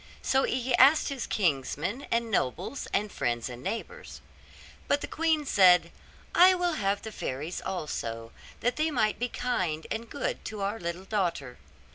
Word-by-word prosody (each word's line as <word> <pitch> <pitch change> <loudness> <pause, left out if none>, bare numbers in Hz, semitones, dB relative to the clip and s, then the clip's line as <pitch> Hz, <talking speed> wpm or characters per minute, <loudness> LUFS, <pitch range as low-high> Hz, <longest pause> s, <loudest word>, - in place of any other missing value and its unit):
So 265 0 +2
he 255 0 -1
asked 280 +5 +6
his 275 -3 -4
kinsmen, 180 - -1
and 230 -1 0
nobles, 195 - -1
and 210 0 0
friends, 120 0 -2
and 120 0 -8
neighbours. 470 - -6 0.7
But 285 - +2
the - - -4
queen 320 -2 +1
said, 180 -7 +5 0.4
'I 370 +1 +7
will 355 -1 0
have 200 -7 -1
the 220 - -6
fairies 150 -1 -4
also, 115 -10 -4 0.3
that 245 +1 0
they 310 +1 +1
might 220 -7 +1
be 245 +1 -1
kind 180 -13 -2
and 230 0 -4
good 285 - -3
to 215 -2 -5
our 205 +3 -2
little 170 +2 -5
daughter. 170 - -2
210 Hz, 160 wpm, -28 LUFS, 170-265 Hz, 0.7 s, I